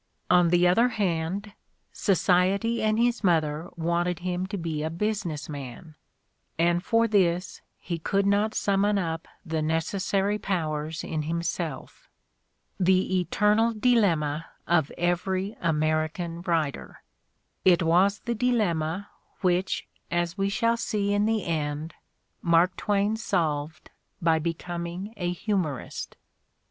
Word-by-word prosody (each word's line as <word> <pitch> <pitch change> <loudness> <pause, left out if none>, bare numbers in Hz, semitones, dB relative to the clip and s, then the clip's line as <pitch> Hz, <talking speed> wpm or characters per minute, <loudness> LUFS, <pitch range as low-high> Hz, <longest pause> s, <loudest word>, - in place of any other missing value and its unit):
On 180 -1 +5
the 175 +1 +4
other 225 +8 +4
hand, 195 -1 -2 0.4
society 195 +4 +2
and 215 0 +2
his 235 0 +1
mother 160 -2 +1
wanted 170 +1 0
him 180 +1 -2
to 200 +1 -4
be 165 -3 -3
a 155 - -1
business 175 -3 -2
man, 145 +2 -8 0.6
and 170 +1 +2
for 230 +1 +3
this 180 -4 +1 0.2
he 170 -2 -5
could 195 +4 0
not 205 +2 +2
summon 200 +1 +2
up 165 -3 -3 0.2
the 160 -2 -1
necessary 190 +6 0
powers 155 -5 -2
in 155 -1 -2
himself. 165 -1 -4 0.7
The 185 0 +3
eternal 210 +6 +2
dilemma 170 -10 +2 0.2
of 160 -4 +2
every 185 +3 -1
American 155 +1 0
writer! 165 -5 -2 0.6
It 180 -2 +5
was 185 +5 +3
the 235 - -2
dilemma 200 -7 0 0.3
which, 185 0 0 0.2
as 175 0 -1
we 195 0 0
shall 230 +3 +1
see 205 -3 -1
in 205 +1 +2
the 220 -3 0
end, 155 -1 -2 0.5
Mark 170 +2 +3
Twain 205 +1 0
solved 155 -6 -2 0.3
by 165 -1 +3
becoming 170 +4 -4
a 175 -3 -2
humorist. 180 - -3
175 Hz, 120 wpm, -26 LUFS, 165-200 Hz, 0.7 s, On